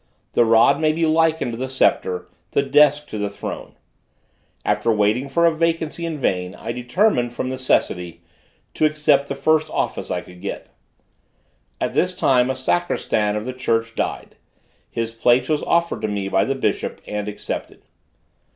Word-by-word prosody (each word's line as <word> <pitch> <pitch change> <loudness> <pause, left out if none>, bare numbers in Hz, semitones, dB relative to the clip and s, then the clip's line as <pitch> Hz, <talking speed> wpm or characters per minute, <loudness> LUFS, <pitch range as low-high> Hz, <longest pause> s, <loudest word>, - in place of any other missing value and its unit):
The - - +4
rod 115 +6 +5
may 155 0 +3
be 165 +1 +1
likened 160 -4 +2
to 115 - -5
the 130 +1 -3
sceptre; 95 -8 +1 0.3
the 140 - +3
desk 150 +1 +4
to 110 - -5
the 105 0 -1
throne. 100 - -7 0.9
After 115 - +1
waiting 110 +5 +1
for 170 +5 +2
a 165 - +4
vacancy 165 0 -1
in 160 -2 -4
vain, 90 -7 -1
I - - -5
determined, 125 - +1
from 130 +1 -3
necessity, 90 -9 -1 0.5
to 155 - +1
accept 150 -2 +2
the 140 - -3
first 155 +3 +2
office - - -2
I - - -1
could 90 0 -15
get. 100 - -6 1.1
At - - -2
this - - +1
time 125 -2 +3
the 130 - -1
sacristan 105 -1 0
of 105 +1 -3
the 130 - -4
church 115 -2 -1
died; - - -4 0.5
his 115 0 -3
place 120 +2 +3
was 155 -1 0
offered 170 0 +1
to 110 - -1
me 100 -2 -3
by 95 0 +2
the 135 - -1
bishop 135 - -2
and 105 0 -4
accepted. 105 0 -6
130 Hz, 170 wpm, -21 LUFS, 105-150 Hz, 1.1 s, rod